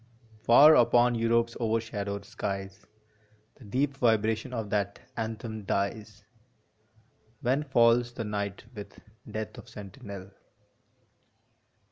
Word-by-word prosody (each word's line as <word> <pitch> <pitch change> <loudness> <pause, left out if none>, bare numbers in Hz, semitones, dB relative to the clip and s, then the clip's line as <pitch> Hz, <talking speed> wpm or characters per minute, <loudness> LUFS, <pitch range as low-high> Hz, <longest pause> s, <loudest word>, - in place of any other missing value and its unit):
Far 145 +8 +8
upon 120 0 +4
Europe 115 0 +2
s 115 - -11
overshadowed 110 -3 -2
skies 100 0 -5 0.7
The 130 - -15
deep 135 +6 -1
vibration 110 0 +1
of 110 -4 -4
that 100 -1 -1 0.2
anthem 110 -1 -5
dies, 105 +2 -3 1.2
When 130 +4 +1
falls 120 -3 +3
the 120 -1 -5
night 100 -2 -4
with 105 -3 -10 0.3
Death 110 0 -5
for - - -12
sentinel. 100 -1 -10
110 Hz, 105 wpm, -28 LUFS, 100-120 Hz, 1.2 s, Far